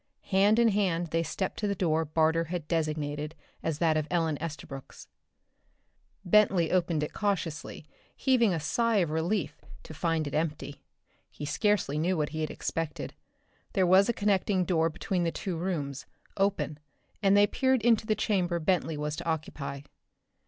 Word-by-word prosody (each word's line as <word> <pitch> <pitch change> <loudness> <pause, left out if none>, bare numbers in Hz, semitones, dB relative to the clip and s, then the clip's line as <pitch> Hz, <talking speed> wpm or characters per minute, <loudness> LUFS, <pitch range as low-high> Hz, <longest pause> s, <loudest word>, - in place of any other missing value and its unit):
Hand 200 +3 +4
in 235 -1 +5
hand 180 -5 0
they 165 - +2
stepped 185 +4 -3
to 210 - 0
the 200 - 0
door 160 -3 +1
Barter 160 +2 +2
had 165 -2 -5
designated 155 -2 -2 0.3
as 160 -2 -2
that 160 -1 +2
of 155 -1 -1
Ellen 165 -3 +1
Estabrook's. 140 -4 -7 1.2
Bentley 185 -3 +4
opened 170 -4 +1
it 150 - -4
cautiously, 175 -8 -2 0.3
heaving 245 -6 +3
a 170 - 0
sigh 230 +9 +1
of 175 -6 +2
relief 170 +6 -1 0.2
to - - -10
find 165 0 0
it 145 - -5
empty. 150 -2 -3 0.5
He 145 - -7
scarcely 155 -1 +1
knew 180 +3 +1
what 150 -1 0
he 155 0 -4
had 155 - -1
expected. 165 -2 -4 0.6
There 190 -2 +3
was 190 +4 +5
a - - +3
connecting 200 -3 +1
door 165 -3 +2
between 175 +2 -2
the 165 - 0
two 185 0 -4
rooms, 155 -6 -3 0.3
open, 160 -7 0 0.4
and 200 -1 +4
they 205 - +7
peered 260 +2 +1
into 225 -2 +3
the 215 - +2
chamber 185 -5 0
Bentley 165 -2 0
was 150 0 -2
to - - -6
occupy. 145 -4 -3
165 Hz, 165 wpm, -29 LUFS, 155-195 Hz, 1.2 s, they